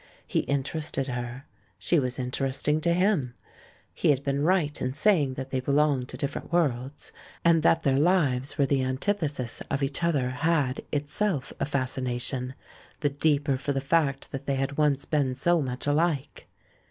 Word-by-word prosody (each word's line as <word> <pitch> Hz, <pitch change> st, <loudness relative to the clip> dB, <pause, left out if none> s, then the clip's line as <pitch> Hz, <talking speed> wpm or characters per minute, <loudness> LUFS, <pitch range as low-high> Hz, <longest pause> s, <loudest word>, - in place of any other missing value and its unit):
He -, -, 0 dB
interested 140 Hz, 0 st, -1 dB
her; 125 Hz, +2 st, -5 dB, 0.3 s
she 170 Hz, -, +2 dB
was 125 Hz, -2 st, -2 dB
interesting 135 Hz, +4 st, 0 dB
to 170 Hz, -, +2 dB
him. 180 Hz, -, +1 dB, 0.6 s
He -, -, +1 dB
had 140 Hz, -2 st, +3 dB
been 140 Hz, 0 st, 0 dB
right 155 Hz, -2 st, +1 dB
in 130 Hz, +1 st, -2 dB
saying 150 Hz, -7 st, +3 dB
that 130 Hz, 0 st, -6 dB
they 130 Hz, -, 0 dB
belonged 140 Hz, -1 st, +1 dB
to -, -, -7 dB
different 140 Hz, -, -4 dB
worlds; 140 Hz, -5 st, -1 dB, 0.3 s
and 165 Hz, -1 st, +5 dB
that 165 Hz, +1 st, +3 dB
their 135 Hz, -1 st, +3 dB
lives 145 Hz, -6 st, +2 dB
were 140 Hz, -, +4 dB
the 135 Hz, -1 st, +1 dB
antithesis 140 Hz, -, -2 dB
of 140 Hz, 0 st, -1 dB
each 140 Hz, +4 st, -2 dB
other 140 Hz, -7 st, +1 dB
had, 145 Hz, -2 st, 0 dB
itself, 150 Hz, +1 st, -1 dB
a -, -, +1 dB
fascination 130 Hz, -1 st, -2 dB, 0.2 s
— -, -, -25 dB
the 145 Hz, -2 st, +1 dB
deeper 145 Hz, -1 st, +1 dB
for 140 Hz, +2 st, -2 dB
the 135 Hz, -, 0 dB
fact 140 Hz, -1 st, 0 dB
that 135 Hz, 0 st, -6 dB
they 140 Hz, -, +1 dB
had 135 Hz, +1 st, -2 dB
once 145 Hz, -2 st, +2 dB
been 140 Hz, -4 st, 0 dB
so 170 Hz, +5 st, +2 dB
much 125 Hz, -2 st, -4 dB
alike. 145 Hz, -1 st, 0 dB
140 Hz, 170 wpm, -27 LUFS, 130-155 Hz, 0.6 s, and